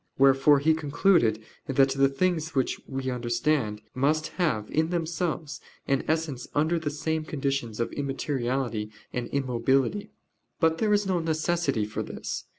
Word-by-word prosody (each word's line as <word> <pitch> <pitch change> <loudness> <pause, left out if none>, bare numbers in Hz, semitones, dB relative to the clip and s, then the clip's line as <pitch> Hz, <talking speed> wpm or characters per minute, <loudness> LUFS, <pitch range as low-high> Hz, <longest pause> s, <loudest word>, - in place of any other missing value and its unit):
Wherefore 135 +2 +6
he 155 +3 +3
concluded 145 - +2 0.2
that 135 0 +4
the 135 0 +3
things 160 +1 -1
which 130 -2 0
we 135 -1 -3
understand 120 -2 0
must 150 +4 +1
have 115 -12 +1
in 160 +1 +1
themselves 165 -3 -2 0.3
an 135 -1 +2
existence 155 -6 -2
under 160 +3 +2
the 155 -2 -2
same 155 +2 -2
conditions 135 -7 -2
of 115 - -1
immateriality 130 -5 -2 0.2
and 125 -1 -2
immobility. 135 - 0 0.5
But 160 -1 +2
there 215 -1 +2
is 205 0 +3
no 185 -2 +1
necessity 160 -6 0
for 105 - -4
this. - - -5
140 Hz, 145 wpm, -27 LUFS, 130-160 Hz, 0.5 s, Wherefore